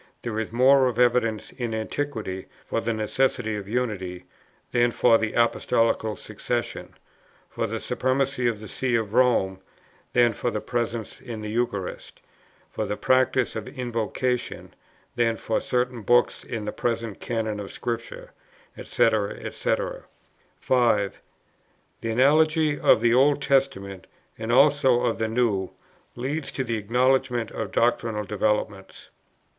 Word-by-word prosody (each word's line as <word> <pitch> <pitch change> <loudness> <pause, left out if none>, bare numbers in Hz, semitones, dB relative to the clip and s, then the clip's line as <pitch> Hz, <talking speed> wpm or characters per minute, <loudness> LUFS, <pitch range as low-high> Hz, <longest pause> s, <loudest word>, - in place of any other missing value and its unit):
there 110 -2 -3
is 110 - -3
more 130 +2 +5
of 120 -3 -2
evidence 120 -3 +2
in 120 -4 -4
Antiquity 110 -5 -4 0.2
for 115 - -1
the 115 - -1
necessity 110 0 0
of 100 -1 -6
Unity, 95 -7 -3 0.5
than 120 0 +3
for 115 -1 +4
the 110 -1 -2
Apostolical 115 -2 +1
Succession; - - -4 0.5
for - - -3
the - - -3
Supremacy 130 -1 0
of 115 -3 -1
the 110 - -9
See 125 +3 -1
of 110 -2 -1
Rome, 115 -7 +3 0.5
than 120 -2 +4
for 120 - -2
the 105 - -2
Presence 115 -1 -3
in 115 -3 -7
the 105 0 -5
Eucharist; 110 -5 -3 0.5
for - - -4
the 105 - -3
practice 130 -1 +2
of 110 - -5
Invocation, 125 -1 -3 0.4
than 115 -2 +1
for 110 - -1
certain 125 -1 -1
books 120 +4 +2
in 115 -3 -5
the 105 - -2
present 115 -3 -3
Canon 110 -3 -2
of 100 - -7
Scripture, - - -5 0.4
&c. - - +2 0.4
&c. - - 0 0.8
5. 115 -6 +1 0.8
The 115 - -3
analogy 150 +5 +3
of - - +5
the 120 0 +4
Old 140 +3 +4
Testament, 130 -10 0 0.3
and 110 +1 -4
also 135 -1 +5
of 120 -2 0
the 110 - 0
New, 110 -5 0 0.5
leads 140 +5 -3
to 130 - -1
the 115 -2 -2
acknowledgment 125 +2 +1
of - - -4
doctrinal 110 -2 +1
developments." 105 -1 -2
120 Hz, 140 wpm, -25 LUFS, 110-130 Hz, 0.8 s, more